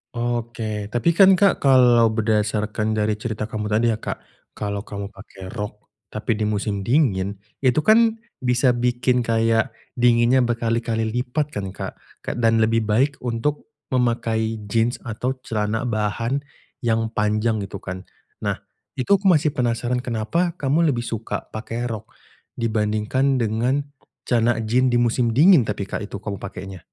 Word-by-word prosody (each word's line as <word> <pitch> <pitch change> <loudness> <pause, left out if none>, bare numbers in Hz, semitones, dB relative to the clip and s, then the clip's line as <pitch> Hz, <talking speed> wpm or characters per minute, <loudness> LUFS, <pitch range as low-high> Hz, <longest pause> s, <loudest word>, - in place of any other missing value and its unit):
Oke, 115 -3 -3
tapi 120 +9 +1
kan, 190 +2 +7
Kak, 200 +1 +3
kalau 125 -4 +5
berdasarkan 110 -1 0
dari 105 0 0
cerita 110 -1 -3
kamu 105 -1 -4
tadi 115 +2 +2
ya, 110 - -2
Kak, - - -5 0.4
kalau 100 -1 -3
kamu 100 0 -6
pakai 95 -2 -11
rok 105 -2 -6 0.2
tapi 110 +2 -3
di 105 - +1
musim 105 -1 -1
dingin 105 -8 +2 0.2
itu 135 +3 +2
kan 225 +3 +5 0.2
bisa 125 0 +2
bikin 125 +1 +1
kayak 115 -1 +1 0.2
dinginnya 120 +1 +4
berkali-kali 115 -1 0
lipat 125 +5 -1
kan, 95 -2 -5
Kak. - - -6 0.2
Ke - - -3
dan 115 -1 +3
lebih 115 0 +1
baik 135 +7 +2
untuk 125 +5 -2 0.2
memakai 115 -3 0 0.2
jeans 115 +2 +2
atau 120 +3 -3
celana 110 0 -1
bahan 115 +3 -1 0.4
yang 115 -2 0
panjang 105 +1 +1
gitu 100 -1 -6
kan. 95 0 -7 0.3
Nah, - - -1 0.4
itu 130 +9 -3
aku 200 - 0
masih 155 -4 +4
penasaran 120 0 -1
kenapa 130 +9 -1
kamu 155 +3 +2
lebih 120 - -2
suka 115 -1 -4
pakai 115 +2 -4
rok 110 -3 -4 0.5
dibandingkan 110 +4 0
dengan 120 +4 0 0.4
celana 115 -1 +1
jeans 125 +4 +2
di 120 - +1
musim 120 -1 +2
dingin 155 - +6
tapi, 105 -1 -2
Kak, 95 - -4
itu - - -8
kamu 100 -1 -5
pakainya? 95 -1 -8
115 Hz, 150 wpm, -22 LUFS, 110-125 Hz, 0.5 s, kan